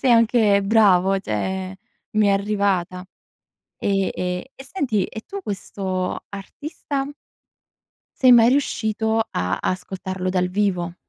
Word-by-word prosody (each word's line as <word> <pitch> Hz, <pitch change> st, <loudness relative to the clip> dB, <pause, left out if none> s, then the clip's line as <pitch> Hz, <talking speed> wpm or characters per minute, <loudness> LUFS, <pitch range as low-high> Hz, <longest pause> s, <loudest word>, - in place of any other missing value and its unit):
sei 260 Hz, -, +2 dB
anche 225 Hz, -3 st, +4 dB
bravo, 195 Hz, -3 st, +4 dB
cioè, 190 Hz, -, -3 dB, 0.4 s
mi 215 Hz, -1 st, +4 dB
è -, -, +4 dB
arrivata. 195 Hz, -3 st, 0 dB, 0.8 s
E 195 Hz, -1 st, 0 dB
e 180 Hz, +6 st, -3 dB
e 270 Hz, -, -11 dB
senti: 265 Hz, -, -1 dB
e 220 Hz, -, -8 dB
tu 395 Hz, 0 st, -6 dB
questo 190 Hz, -, -4 dB
artista 270 Hz, -, -5 dB, 1.2 s
sei 255 Hz, -, +7 dB
mai 235 Hz, -1 st, +7 dB
riuscito 220 Hz, -4 st, +1 dB
a 90 Hz, +2 st, -1 dB
ascoltarlo 185 Hz, 0 st, -3 dB
dal 180 Hz, -1 st, +1 dB
vivo? 180 Hz, -3 st, -1 dB
200 Hz, 120 wpm, -22 LUFS, 185-225 Hz, 1.2 s, sei